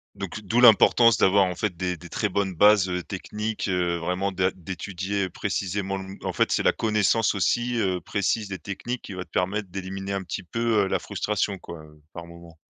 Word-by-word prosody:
Donc, 100 +1 -6
d'où 110 +4 +1
l'importance 115 -1 +6
d'avoir, 95 +1 +4
en 90 -1 -3
fait, 95 -3 -2
des 90 0 -2
des 85 +1 -12
très 105 - -1
bonnes 100 -1 -1
bases, 100 +1 +5
heu, 90 0 -2
techniques. 105 +3 -4
Heu, 90 -2 0
vraiment 90 +3 -2
det 95 0 +1
d'étudier 95 +2 -4
précisément 95 +2 -2
le 95 - -6
mo 95 +1 -9
en - - -2
fait, - - +1
c'est - - +1
la - - +4
connaissance 110 0 +2
aussi, 120 +6 0
heu, 95 -4 0
précise 100 +4 -1
des 95 -2 -5
techniques 115 +7 -5
qui 100 - -8
va 90 - -5
te - - -28
permettre 95 +2 -1
d'éliminer 95 +1 -5
un 100 -1 -2
petit 90 - -5
peu, 115 +2 +1
heu, - - -1
la 95 -1 0
frustration, 100 +2 -2
quoi, 85 -1 -9
heu, 75 0 -19
par 85 -1 -8
moments? 85 -1 -14
95 Hz, 210 wpm, -25 LUFS, 90-105 Hz, -, l'importance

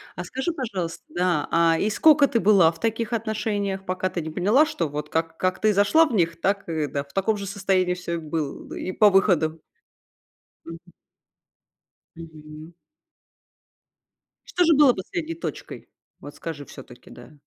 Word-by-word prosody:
А 180 - -5
скажи, 265 - -3
пожалуйста, 195 - -5
да, 175 -4 0
а, 165 -1 +3
и 210 - +1
сколько 290 +5 +5
ты 235 - 0
была 195 -6 +5
в 165 - -16
таких 225 0 -2
отношениях, 210 -3 -2
пока 185 0 -2
ты 175 - -4
не 160 - -6
поняла, 205 - +3
что 170 - -3
вот 150 +1 -6
как 165 0 -2
как 185 0 -1
ты 215 -1 +3
зашла 205 +12 +4
в 295 - -5
них, 170 -5 0
так 195 0 -1
и 155 -2 -1
да, 140 0 -3
в 140 0 -23
таком 210 +3 0
же 200 - -6
состоянии 190 -2 0
всё 180 -1 -6
и - - -1
было 155 -2 -4
бы - - -8
и 185 - -3
по 210 +2 +5
выходу? 165 -5 +2 1.0
Мгм. 165 +2 -11 1.2
Мгм. 155 0 -12 1.7
Что 360 - +1
же 330 -1 +5
было 285 -3 +6
последней 320 - -5
точкой? 335 - -7 0.3
Вот 145 +1 -10
скажи 150 -3 -7
всё-таки, 130 -3 -14
да. 120 +5 -14
185 Hz, 170 wpm, -24 LUFS, 165-215 Hz, 1.7 s, было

